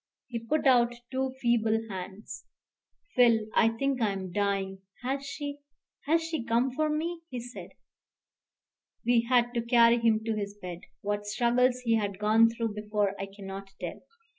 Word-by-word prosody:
He 240 -2 -4
put 290 +8 -1
out 240 -2 +5 0.2
two 260 0 -1
feeble 225 -3 +2
hands. 190 +1 -7 0.7
"Phil 235 -3 +5
I 225 - +5
think 260 +3 -1
I 210 -3 +2
am 190 -2 -5
dying 195 -1 -1 0.2
has 270 +2 -1
she 285 +1 -5 0.5
has 325 +2 +3
she 320 -6 -2
come 235 +3 +1
for 310 +4 0
me?" 330 +3 -2
he 250 - -4
said. 245 +1 -9 1.3
We 235 -1 +3
had 245 -1 +3
to 235 - 0
carry 235 0 +5
him 225 -1 +2
to 225 0 -1
his 200 -1 -4
bed. 180 -3 -6 0.2
What 205 0 -2
struggles 245 +3 +2
he 230 -2 +2
had 200 -3 -2
gone 220 +2 +5
through 230 -1 -3
before 210 -1 -1
I 195 - -3
cannot 195 0 -8
tell. - - -6
230 Hz, 165 wpm, -29 LUFS, 205-250 Hz, 1.3 s, out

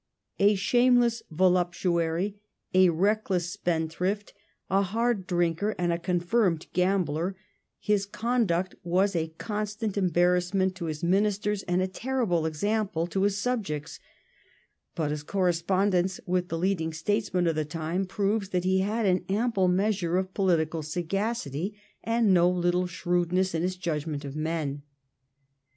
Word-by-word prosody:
A 205 +1 +5
shameless 240 +2 +3
voluptuary, 175 +2 +1 0.3
a 185 -1 +6
reckless 185 0 +1
spendthrift, 180 +2 -2 0.3
a 195 +1 +2
hard 215 0 0
drinker, 175 +4 0
and 175 -1 +1
a 170 - -2
confirmed 175 0 +1
gambler, 180 -1 0 0.4
his 205 -2 0
conduct 205 -6 0
was 185 +3 +1
a 165 -1 0
constant 210 -1 -3
embarrass 180 0 +2
ment 190 -1 +2
to 185 -2 -6
his 155 0 -4
ministers 205 +2 +1
and 180 +1 +1
a - - 0
terrible 195 -6 -1
example 195 +1 -1
to 185 +3 -2
his 200 0 +2
subjects; 195 -11 -3 1.0
but 155 -3 -1
his 150 0 -3
correspondence 185 +2 +1
with 180 0 0
the 165 - -3
leading 165 -2 0
statesmen 185 +2 0
^ - - +2
of 165 - +2
the 155 0 -1
time 165 +5 -3
proves 200 +1 -1
that 180 -2 -1
he 190 +1 +2
had 215 +4 0
an 185 -2 +2
ample 205 -2 +1
measure 185 -2 +1
of 185 0 -2
political 165 -5 +1
sagacity 180 - -3 0.2
and 230 -3 +3
no 175 0 +5
little 180 0 +1
shrewdness 175 +1 0
in 165 - 0
his 185 +1 -1
judgment 155 -4 -3
of 140 0 -7
men. 155 -2 -2
185 Hz, 140 wpm, -27 LUFS, 170-200 Hz, 1.0 s, a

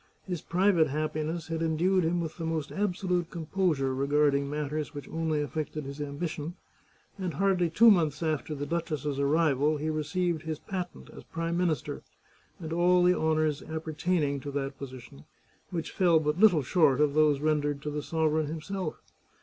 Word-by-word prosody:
His 180 -4 -4
private 180 -2 +3
happiness 155 +3 -3
had 165 0 -2
endued 170 +3 +2
him 170 +2 +1
with 160 -1 -5
the 165 - -5
most 160 -2 -2
absolute 180 -3 -1
composure 165 -5 0
regard 145 +2 +2
ing 140 0 0
matters 150 +1 -3
which 145 - -7
only 160 -2 -1
affected 155 0 -4
his 140 +2 -6
ambition, 150 +3 -4 0.6
and 180 -5 -3
hardly 185 -2 +2
two 225 +7 +7
months 160 -5 +2
after 155 -1 -1
the 145 0 -4
duchess's 150 -4 -2
arrival 150 0 +2
he 155 +2 -2
received 160 +2 -1
his 155 -1 -4
patent 175 - -6
as - - -11
Prime 165 +1 -3
Minister, 170 -6 -1 0.6
and 160 -2 -5
all 175 +1 +4
the 180 0 +5
honours 155 -2 +1
appertaining 160 -1 -1
to 145 - -6
that 135 -1 -4
position, 125 - -10 0.4
which 165 -3 -4
fell 175 -5 +4
but 150 +2 -1
little 185 -9 +6
short 145 -2 +3
of 150 -1 +3
those 150 -2 +4
rendered 145 -1 0
to 150 - -3
the 150 0 -3
sovereign 155 0 0
himself. 165 +2 -4
155 Hz, 165 wpm, -29 LUFS, 145-170 Hz, 0.6 s, two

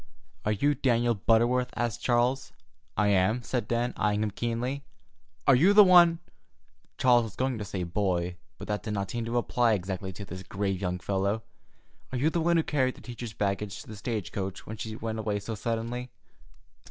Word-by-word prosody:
"Are 105 - +2
you 145 +8 +2
Daniel 120 -3 +2
Butterworth?" 120 +4 +2
asked 120 -1 -2
Charles. 125 +2 +1 0.5
"I 105 0 +3
am," 100 +5 +2
said 120 +2 -2
Dan, 120 +1 0
eying 105 0 +2
him 105 - -1
keenly. 120 +6 -2 0.6
"Are 140 - +6
you 175 +11 +5
the 210 0 +10
one"—Charles 165 - +2
was 110 - -9
going 130 -3 -1
to - - -3
say 95 -2 -4
"boy," 90 -1 -1 0.2
but - - -8
that 105 -2 -2
did 105 +2 -4
not 100 -1 -2
seem 120 -1 -3
to 115 +1 -1
apply 120 -1 +2
exactly 95 0 -3
to 100 +3 -8
this 95 0 -7
grave 95 0 -2
young 90 -1 -1
fellow—"are 100 +6 -5
you 150 +6 +2
the 170 - 0
one 170 +1 +3
who 165 - +3
carried 130 -4 0
the - - -14
teacher's 120 -2 -7
baggage 100 0 -2
to - - -20
the 110 - -8
stage 105 -4 -4
coach 95 -1 -4
when 110 - -7
she 110 0 -5
went 110 0 -4
away 105 -1 -1
so 105 +3 -5
suddenly?" 115 +3 -3
115 Hz, 190 wpm, -28 LUFS, 100-125 Hz, 0.6 s, the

